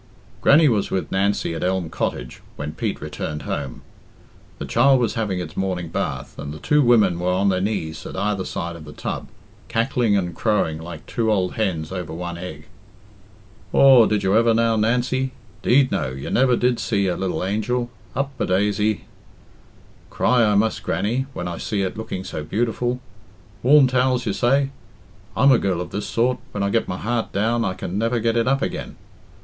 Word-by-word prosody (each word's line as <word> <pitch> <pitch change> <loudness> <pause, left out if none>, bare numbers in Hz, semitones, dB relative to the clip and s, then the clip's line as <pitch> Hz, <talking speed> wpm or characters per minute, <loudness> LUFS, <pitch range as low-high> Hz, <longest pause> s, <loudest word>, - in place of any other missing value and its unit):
Grannie 155 +2 +6
was 110 -6 +1
with 95 - -2
Nancy 95 -3 0
at - - -4
Elm 95 -1 0
Cottage 60 0 -3
when 75 +1 -5
Pete - - -3
returned 75 -1 -5
home. 70 -4 -4 0.7
The - - -5
child 135 +3 +4
was 120 -4 0
having 105 -5 -1
its 90 - -6
morning 90 -3 -2
bath, - - -4
and 75 0 -5
the 75 - -7
two 150 - +2
women 110 -9 +4
were 90 +1 0
on 95 +2 +2
their 95 -1 +1
knees 95 -6 -2
at - - -8
either 100 -1 -1
side 85 -2 -4
of 80 -2 -10
the 75 - -10
tub, - - -5 0.4
cackling 115 -2 +1
and 90 -3 -2
crowing 90 -7 0
like 85 -1 -9
two 110 -2 0
old 95 -3 +1
hens 90 -8 -2
over 90 -3 -5
one 85 +1 -5
egg. 80 -4 -8 1.1
"Aw, 130 -4 +7
did 105 -1 0
you 95 +2 +2
ever, 115 0 +4
now, 115 0 +2
Nancy? 125 +4 0 0.3
'Deed, 130 +1 +4
no; - - 0
you 65 +1 -6
never 125 0 +4
did 120 -1 +1
see 100 -3 0
such 90 - +1
a - - -7
lil 90 -4 -2
angel. 120 +5 -1 0.2
Up 140 +2 -1
a - - 0
daisy!" 105 +2 +1 1.0
"Cry 125 -2 +2
I 105 -2 +3
must, 110 +2 +1
Grannie, 125 +6 -1
when 90 - -4
I 85 - -5
see 100 -3 -1
it 95 - -3
looking 110 -4 -5
so 80 -4 -5
beautiful. 120 +7 -1 0.6
Warm 140 +2 +6
towels, 125 -1 +1
you 105 - 0
say? 135 +6 +2 0.7
I'm 140 0 +6
a 125 - +5
girl 95 -3 0
of 90 - -5
this 105 - -3
sort 125 +2 +1
when 100 - -2
I 100 - 0
get 115 +1 +1
my 90 - -3
heart 115 +3 -2
down, 115 +4 +1
I 95 -3 -1
can 90 +1 -4
never 115 +2 +1
get 115 +1 +1
it 115 +1 +1
up 135 +1 +2
again. - - -4
105 Hz, 195 wpm, -22 LUFS, 90-120 Hz, 1.1 s, Aw